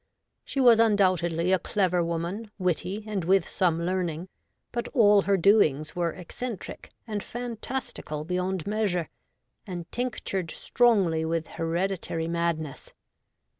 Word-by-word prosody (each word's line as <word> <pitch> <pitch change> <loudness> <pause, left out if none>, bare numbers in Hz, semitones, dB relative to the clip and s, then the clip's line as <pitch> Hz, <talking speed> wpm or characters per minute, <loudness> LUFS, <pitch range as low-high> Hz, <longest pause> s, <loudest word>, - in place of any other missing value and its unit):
She 275 - -4
was 240 -4 +7
undoubtedly 185 -6 +3
a 190 - +4
clever 180 -4 +1
woman, 170 +6 -3
witty, 185 +2 -1
and 210 -4 -2
with 185 0 +3
some 170 -2 +1
learning; 180 -1 -2 0.4
but 240 0 -3
all 205 -4 +6
her 195 0 +2
doings 160 -6 +3
were 170 -1 0
eccentric 205 +4 -7 0.2
and 210 -3 -3
fantastical 240 - -5
beyond 180 +1 -2
measure, 200 -6 -1 0.6
and 175 -3 -5
tinctured 215 -7 -2
strongly 195 -11 +2
with 165 0 -1
hereditary 165 0 -2
madness. 165 -3 -2
185 Hz, 120 wpm, -27 LUFS, 170-210 Hz, 0.6 s, was